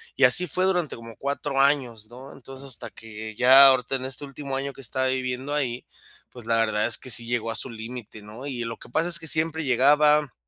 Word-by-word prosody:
y 135 - -1
así 175 +9 +7
fue 185 +4 -2
durante 180 -6 -1
como 115 -1 -12
4 140 0 -4
años, 125 -6 0
¿no?, 130 +3 -13
entonces 135 +1 -12
hasta 130 - -3
que 110 -1 -10
ya 135 +3 +7
ahorita 130 0 +1
en 130 0 -5
este 135 +2 -1
último 140 0 -7
año 140 0 -4
que 135 - -14
estaba 130 +1 0
viviendo 130 +2 -4
ahí, 125 -4 -4 0.5
pues, 120 -3 -11
la 115 0 +1
verdad 110 -1 0
es 115 - +4
que 130 - -8
sí 115 +1 0
llegó 115 -1 -3
a - - -6
su 130 - -3
límite, 115 -1 -10
¿no?, 110 +6 -10
y 125 -4 -5
lo 115 - -7
que - - -16
pasa 165 +8 -1
es 170 - +6
que 160 - -6
siempre 160 +1 +4
llegaba, 145 +3 +2
130 Hz, 230 wpm, -23 LUFS, 115-140 Hz, 0.5 s, así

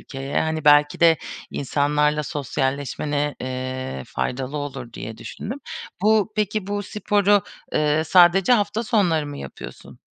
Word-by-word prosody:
ülkeye. 135 +1 -3
Hani, 160 -1 -2
belki 145 0 +5
de 165 -1 +6 0.3
insanlarla 150 +2 +1
sosyalleşmene, 145 +1 -2
eee, 130 - -4
faydalı 130 +3 -3
olur 145 -5 -6
diye 110 0 -7
düşündüm. 240 - -6 0.4
Bu 215 0 +3
peki, 210 -1 -1
bu 205 0 -2
sporu, 205 0 +2 0.3
eee, 150 +1 +2
sadece 180 +6 +5
hafta 210 -1 +1
sonları 185 -10 +1
mı 145 0 -7
yapıyorsun? 70 - -10
150 Hz, 125 wpm, -22 LUFS, 140-200 Hz, 0.4 s, de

